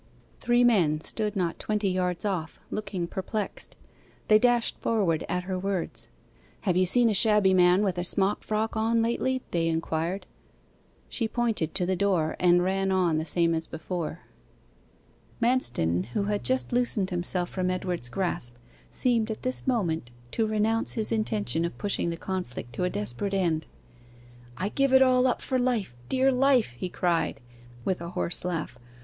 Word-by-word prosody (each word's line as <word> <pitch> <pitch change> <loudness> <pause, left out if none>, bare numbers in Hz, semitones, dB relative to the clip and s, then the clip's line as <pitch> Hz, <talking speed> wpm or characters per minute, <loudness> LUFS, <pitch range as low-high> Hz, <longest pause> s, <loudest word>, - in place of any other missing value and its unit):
Three 240 0 +3
men 175 -11 +3
stood 210 +6 -2
not 175 -4 -1
twenty 210 -1 -1
yards 180 0 -1
off, 180 -6 -3
looking 200 -4 -3
perplexed. 195 +4 -4 0.5
They 215 0 +7
dashed 240 0 +2
forward 190 -8 +1
at 180 0 -1
her 185 0 -3
words. 190 -2 -2 0.5
'Have 185 -4 0
you 185 0 +3
seen 240 +5 +5
a 220 - +2
shabby 210 -2 +5
man 180 +2 +5
with 185 -3 0
a - - -1
smock 195 +2 0
frock 220 +1 -1
on 225 +1 +2
lately?' 255 +2 0
they 165 -1 +1
inquired. 165 +3 -2 0.8
She 230 - -2
pointed 225 -8 -1
to 180 - +2
the 185 +1 0
door, 180 -5 +1
and 175 0 +4
ran 190 +1 0
on 175 -4 +2
the 160 - -3
same 170 0 +2
as 160 0 -2
before. 165 0 -5 1.2
Manston, 95 - +1
who 200 - +1
had 205 0 -1
just 260 0 +1
loosened 235 -6 +1
himself 175 0 +1
from 185 -1 -1
Edward's 180 -8 -2
grasp, 175 -7 -2 0.3
seemed 235 -3 +2
at 220 - -5
this 255 +1 -3
moment 170 - 0 0.2
to 225 - 0
renounce 215 +1 +1
his 220 -1 -2
intention 215 -6 +1
of 170 - -3
pushing 200 -4 -1
the 170 - -4
conflict 165 -11 -5
to - - -2
a - - +1
desperate 120 - -3
end. 165 -5 0 0.9
'I 190 +4 -1
give 275 +3 +1
it 265 0 +8
all 255 0 +4
up 250 - -1
for 260 -2 0
life 235 - -1
dear 265 +1 +3
life!' 255 - +3
he 180 +9 -4
cried, 170 -3 0 0.5
with 185 -3 -1
a 170 - -5
hoarse 175 0 +2
laugh. 165 -8 -4
190 Hz, 165 wpm, -27 LUFS, 170-220 Hz, 1.2 s, it